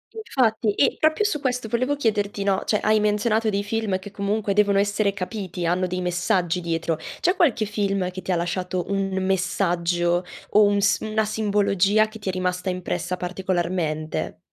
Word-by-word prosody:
Infatti, 230 - +1
e - - +3
proprio 315 +7 +2
su 300 -9 -1
questo 250 -3 -1
volevo 255 +6 0
chiederti, 205 -5 0
no, 195 -1 +1
cioè, 210 - +1
hai 215 0 +4
menzionato 215 +1 +1
dei 200 0 -1
film 205 -3 -1
che 195 +1 -10
comunque 200 0 -1
devono 200 -1 +3
essere 205 0 +1
capiti, 185 -3 -4
hanno 180 +2 +1
dei 180 +1 -3
messaggi 180 0 0
dietro. 165 -1 -1 0.2
C'è 360 +3 +2
qualche 255 -10 +2
film 200 -3 -1
che 185 +1 -7
ti 190 - -3
ha - - +2
lasciato 180 +1 -2
un 195 -1 0
messaggio 175 -2 +1 0.3
o 210 - +6
un 205 0 +3
sim 200 +2 +1
una 220 0 +1
simbologia 210 -1 +2
che 220 0 -11
ti 200 - -4
è - - +1
rimasta 180 0 -2
impressa 180 0 -3
particolarmente? 175 -4 -2
200 Hz, 175 wpm, -23 LUFS, 180-215 Hz, 0.3 s, o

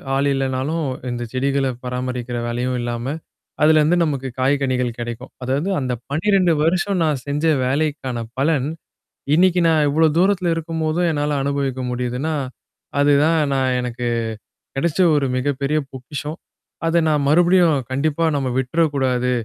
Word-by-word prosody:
ஆள் 140 +1 +2
இல்லன்னாலும் 135 +4 -1 0.2
இந்த 120 0 -3
செடிகள 135 +1 +1 0.2
பராமரிக்கிற 125 -1 -3
வேலையும் 125 +2 -1
இல்லாம, 120 0 -3 0.6
அதுலருந்து 155 +2 +5
நமக்கு 140 -4 -2
காய்கனிகள் 130 -3 +1
கெடைக்கும். 120 +2 -6
அதாவது 140 +9 -1
அந்த 130 -2 -2 0.2
12 180 +3 +2
வருஷம் 185 +4 +1
நான் 150 -5 0
செஞ்ச 145 +2 -1 0.2
வேலைக்கான 135 -3 -1 0.2
பலன், 140 -1 +1 0.7
இன்னைக்கு 180 +1 +4
நான் 155 -2 +3
இவ்ளோ 160 +2 +3
தூரத்தல 185 -3 +2
இருக்கும்போதும் 165 +1 -1
என்னால 145 -1 0
அனுபவிக்க 140 -2 -1
முடியுதுன்னா, 125 +5 -2 0.7
அதுதான் 145 +3 +4 0.2
நான் 130 -1 +1
எனக்கு 125 0 -4 0.7
கெடச்ச 155 +5 -1 0.2
ஒரு 145 -2 +2
மிகப்பெரிய 140 +3 0
பொக்கிஷம். 145 +4 -6 0.5
அத 165 +1 +2
நான் 150 -2 +1
மறுபடியும் 170 -1 +4
கண்டிப்பா 150 +4 0
நம்ம 135 -2 -1
விட்டுறக்கூடாது. 130 -3 +1
140 Hz, 125 wpm, -20 LUFS, 130-160 Hz, 0.7 s, அதுலருந்து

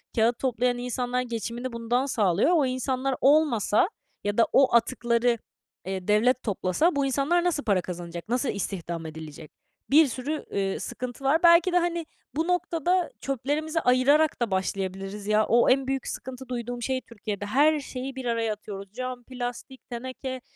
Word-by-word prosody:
kâğıt 230 +1 +2
toplayan 245 -1 0
insanlar 250 0 -2
geçimini 235 +1 -4
bundan 235 +3 0
sağlıyor. 210 - +2
O 295 -4 +3
insanlar 255 +1 -1
olmasa 285 - +4 0.3
ya 205 +1 -2
da 230 - +5
o 265 -3 +5
atıkları, 235 0 +2 0.5
eee, 190 -1 -4
devlet 235 +5 +3
toplasa 210 - +1
bu 280 -1 +1
insanlar 285 +6 +1
nasıl 335 -5 0
para 195 -4 +2
kazanacak, 175 +2 -7
nasıl 250 +1 0
istihdam 170 -4 -4
edilecek? 155 -1 -9 0.4
Bir 305 +2 +6
sürü, 275 +5 -4
eee, 195 -1 -1
sıkıntı 250 +1 -6
var. 290 +5 +3
Belki 340 +1 +6
de, - - +5
hani, 340 -1 0 0.3
bu 325 +3 0
noktada 355 0 +1
çöplerimizi 295 +5 -1
ayırarak 270 +3 +3
da 230 - 0
başlayabiliriz. 195 +2 -3
Ya, 215 0 +3
o 235 +1 +4
en 265 0 +3
büyük 270 -1 -2
sıkıntı 260 0 -7
duyduğum 240 0 -4
şey 260 +1 -1
Türkiye'de, 205 -4 -6
her 295 +8 +3
şeyi 265 -1 -6
bir 260 - -6
araya 230 -2 0
atıyoruz. 200 -2 -9
Cam, 255 0 -5
plastik, 250 +1 -7
teneke, 255 +1 -5
250 Hz, 160 wpm, -26 LUFS, 215-275 Hz, 0.5 s, Bir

